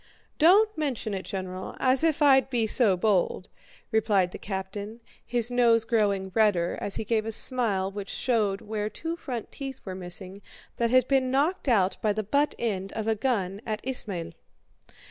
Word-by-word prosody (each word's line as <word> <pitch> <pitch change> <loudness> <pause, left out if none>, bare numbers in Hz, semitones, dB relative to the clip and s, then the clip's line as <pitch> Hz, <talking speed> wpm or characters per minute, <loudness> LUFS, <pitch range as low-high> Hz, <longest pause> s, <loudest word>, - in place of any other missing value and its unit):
"Don't 410 +7 +5
mention 265 -8 -3
it, 190 -1 -4
General, 185 -1 -6
as 260 +3 +3
if 315 -2 +2
I'd 270 -2 +5
be 240 -4 +1
so 215 -4 +3
bold!" 185 -1 0 0.4
replied 210 -5 +2
the - - -8
captain, 200 +3 -6 0.2
his 240 0 -2
nose 235 -2 +3
growing 200 -5 0
redder 205 -6 +2
as 200 - -2
he - - -2
gave 220 0 +1
a 225 - -4
smile 215 -5 +2
which 200 -1 -7
showed 215 -6 0
where 210 0 -3
two 330 +8 -5
front 250 -9 -6
teeth 270 -2 -7
were 190 - -5
missing 185 +2 -6 0.4
that 235 -1 +1
had 255 +1 +4
been 265 -2 +2
knocked 285 +4 0
out 195 -5 +2
by 210 -1 +1
the 215 +1 -2
butt 285 +8 +1
end 195 -4 -3
of 220 -1 -4
a 225 - +3
gun 205 -4 -2
at 215 -1 -3
Ismail. 205 -10 -2
220 Hz, 175 wpm, -27 LUFS, 195-255 Hz, 0.4 s, Don't